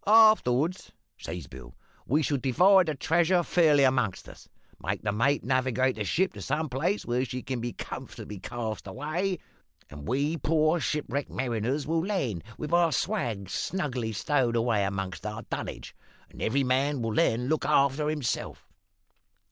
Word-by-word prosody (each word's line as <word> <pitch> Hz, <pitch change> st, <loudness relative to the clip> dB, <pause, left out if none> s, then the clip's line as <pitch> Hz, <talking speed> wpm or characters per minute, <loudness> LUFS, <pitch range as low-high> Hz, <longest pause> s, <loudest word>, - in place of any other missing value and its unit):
"`Afterwards,' 190 Hz, -, +4 dB, 0.3 s
says -, -, -7 dB
Bill, -, -, -12 dB, 0.3 s
`we 150 Hz, +4 st, +3 dB
shall 145 Hz, -, +1 dB
divide 180 Hz, +9 st, +5 dB
the 155 Hz, -, -1 dB
treasure 170 Hz, +5 st, +2 dB
fairly 155 Hz, -5 st, +4 dB
amongst 130 Hz, -7 st, +1 dB
us; -, -, -14 dB, 0.3 s
make 95 Hz, +5 st, -2 dB
the 105 Hz, -, 0 dB
mate 120 Hz, +7 st, +1 dB
navigate 130 Hz, 0 st, +1 dB
the 105 Hz, -, -2 dB
ship 185 Hz, -, +1 dB
to -, -, -9 dB
some 150 Hz, +2 st, -1 dB
place 160 Hz, +11 st, -1 dB
where 120 Hz, +1 st, 0 dB
she 125 Hz, 0 st, -5 dB
can 130 Hz, -3 st, -3 dB
be 120 Hz, +1 st, -3 dB
comfortably 105 Hz, -2 st, -7 dB
cast 110 Hz, 0 st, -5 dB
away; 155 Hz, -, -2 dB, 0.5 s
and 75 Hz, -1 st, -9 dB
we 145 Hz, +6 st, 0 dB
poor 155 Hz, +3 st, +2 dB
shipwrecked 145 Hz, -3 st, -2 dB
mariners 125 Hz, +3 st, -1 dB
will 165 Hz, +1 st, 0 dB
land, 140 Hz, -, -2 dB
with 150 Hz, -, -5 dB
our 170 Hz, -1 st, +4 dB
swag 120 Hz, -, -1 dB
snugly 125 Hz, -, -2 dB
stowed 125 Hz, +1 st, +1 dB
away 115 Hz, -3 st, +2 dB
amongst 95 Hz, -4 st, -4 dB
our 105 Hz, +1 st, -5 dB
dunnage, -, -, -5 dB, 0.4 s
and -, -, -12 dB
every 135 Hz, +5 st, +1 dB
man 130 Hz, +1 st, +1 dB
will 115 Hz, -1 st, -1 dB
then 125 Hz, -3 st, +2 dB
look 155 Hz, +1 st, 0 dB
after 145 Hz, 0 st, +3 dB
hisself.' 150 Hz, -6 st, -3 dB
135 Hz, 155 wpm, -28 LUFS, 115-160 Hz, 0.5 s, divide